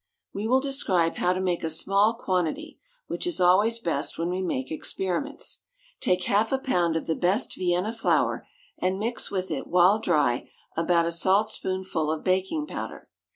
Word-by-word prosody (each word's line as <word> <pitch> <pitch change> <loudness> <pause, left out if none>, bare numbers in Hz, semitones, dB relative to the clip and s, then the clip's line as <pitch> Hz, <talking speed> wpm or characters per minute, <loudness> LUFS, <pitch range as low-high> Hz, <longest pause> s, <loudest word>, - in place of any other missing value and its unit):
We 205 +2 -3
will 260 +3 +3
describe 195 -12 +1
how 180 - +2
to 185 - -3
make 180 -2 -1
a 160 - -1
small 200 +7 +2
quantity, 190 - -2 0.3
which - - -4
is 350 - -1
always 195 +6 +4
best 165 -9 -2
when 170 +2 -1
we 185 +1 -2
make 130 -7 -3
experiments. 190 - -3 0.4
Take 180 0 +1
half 210 +4 +1
a 270 - +2
pound 180 -11 0
of 165 - -2
the 160 - 0
best 185 - 0
Vienna 180 +4 0
flour, 230 - 0 0.3
and 185 +1 0
mix 230 +4 -2
with 185 -2 -3
it, 145 - -3
while 180 +4 +4
dry, 150 - +1 0.3
about 170 0 +2
a 170 - -1
salt 190 +5 +3
spoonful 185 -4 -2
of 155 - -3
baking 190 +12 0
powder. - - -7
185 Hz, 175 wpm, -26 LUFS, 170-220 Hz, 0.4 s, always